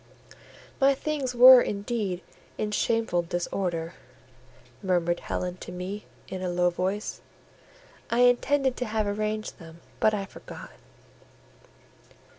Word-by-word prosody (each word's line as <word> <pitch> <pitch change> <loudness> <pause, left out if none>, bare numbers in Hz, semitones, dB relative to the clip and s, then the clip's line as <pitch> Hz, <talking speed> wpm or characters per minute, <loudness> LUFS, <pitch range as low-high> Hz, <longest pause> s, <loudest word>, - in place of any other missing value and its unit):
"My 275 0 +5
things 275 -3 -3
were 250 +1 +10
indeed 205 -4 -2 0.4
in 210 - -2
shameful 225 -4 +1
disorder," 170 -1 -3 0.9
murmured 175 -3 +1
Helen 180 0 -4
to 180 - -9
me, 185 +4 -6 0.2
in 185 - -6
a 185 - -2
low 175 0 +2
voice: 190 +4 -3 0.9
"I 235 +1 +2
intended 260 +2 +3
to 250 - -2
have 215 -1 -1
arranged 215 +1 -3
them, 165 -1 -12 0.2
but 215 0 +3
I 200 -1 -3
forgot." - - -11
205 Hz, 115 wpm, -27 LUFS, 180-235 Hz, 0.9 s, were